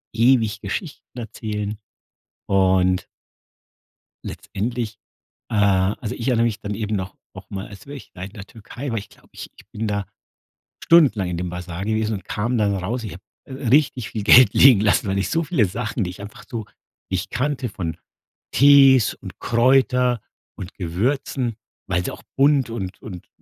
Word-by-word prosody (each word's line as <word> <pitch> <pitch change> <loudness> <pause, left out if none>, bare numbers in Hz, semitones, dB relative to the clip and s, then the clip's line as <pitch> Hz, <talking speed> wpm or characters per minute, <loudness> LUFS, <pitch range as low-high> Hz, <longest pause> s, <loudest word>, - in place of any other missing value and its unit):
ewig 115 -3 +3
Geschichten 125 - -6
erzählen. 105 -2 -4 0.7
Und 95 -1 +2 1.2
letztendlich 115 0 -4 0.5
äh, - - -1
also 100 +3 +1
ich 115 - -5
erinnere 120 -2 +3
mich 110 -3 -1
dann 105 0 -4
eben 105 0 -2
noch 95 0 -5 0.2
nochmal 95 0 -7
als 100 +6 -13
wäre 145 0 -7
ich, - - -14
ja, 90 - -9
in 100 - -7
der 100 -1 -9
Türkei, 120 +5 -8
weil 115 - -1
ich 100 - -12
glaube, - - -22
ich - - -9
ich - - -18
bin 110 +1 -3
da 100 -1 -2 0.8
stundenlang 135 - +4
in 85 - -3
dem 90 0 -3
Basar 90 +1 -6
gewesen 110 0 0
und 95 - -6
kam 115 +4 -2
dann 100 -2 +2
raus. 115 +6 -3
Ich 105 - -6
habe 90 - -11 0.3
richtig 130 -2 +1
viel 110 - -4
Geld 120 -1 +7
liegen 130 -7 +7
lassen, 105 0 +2
weil 95 - 0
ich 95 0 -1
so 165 0 +1
viele 145 - +2
Sachen, 110 +3 -3
die 90 - -4
ich 95 - -11
einfach 105 - -11
so 115 -2 -5 0.5
nicht 95 +1 -2
kannte 130 -1 -1
von 90 -6 -5 0.6
Tees 135 -4 +6
und - - -11
Kräuter 125 0 +3 0.4
und 90 0 -8
Gewürzen, 115 - -2 0.3
weil 90 -2 0
sie - - -3
auch - - -11
bunt 135 -3 +3
und 95 -6 -5
und 90 -5 -9
110 Hz, 170 wpm, -22 LUFS, 95-125 Hz, 1.2 s, Geld